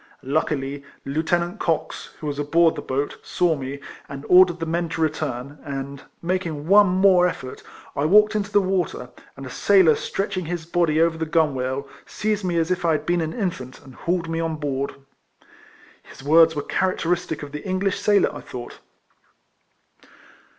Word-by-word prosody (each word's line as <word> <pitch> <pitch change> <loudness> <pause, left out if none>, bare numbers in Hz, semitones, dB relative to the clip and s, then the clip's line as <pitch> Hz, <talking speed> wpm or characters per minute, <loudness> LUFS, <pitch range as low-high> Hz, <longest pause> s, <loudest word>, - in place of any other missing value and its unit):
Luckily, 140 -1 -1 0.2
Lieu 140 +3 -1
tenant 175 +4 -1
Cox, 165 -2 -2
who - - -8
was 145 -1 -3
aboard 165 +3 +3
tlie - - -8
boat, 140 +2 -2
saw 175 -3 +1
me, 140 0 -6 0.3
and 140 0 -8
ordered 180 -1 +6
tlie 165 -1 -4
men 170 +1 -1
to 165 - -5
return, 145 -3 -2
and, 140 -1 -6 0.2
making 170 -4 -2
one 205 +2 +7
more 185 -1 +4
elfort, 130 -6 -8 0.3
I 140 - 0
walked 210 +5 +5
into 205 -1 -2
the 205 0 +4
water, 185 -9 -2 0.3
and 135 - -8
a - - -7
sailor 190 -6 +5
stretching 185 +2 -3
his 170 0 -4
body 165 -2 +1
over 165 0 +2
the 160 - -2
gunwale, 140 -4 0 0.2
seized 210 -1 -2
me 175 -2 -1
as 165 +1 +1
if 180 -1 -1
I 165 -1 +3
had 150 - -2
been 175 0 +1
an 160 0 -3
infant, 170 - -4
and 130 - -14
hauled 170 +5 -2
me 165 0 -2
on 165 -1 -1
board. 140 -3 -3 1.1
His - - -14
words 160 +2 +5
were 145 - -2
characteristic 175 -4 -1
of 145 - -8
the 150 - -7
English 190 0 -1
sailor, 205 -1 +2
I - - -7
thought. 120 -1 -9
165 Hz, 175 wpm, -23 LUFS, 145-180 Hz, 1.1 s, one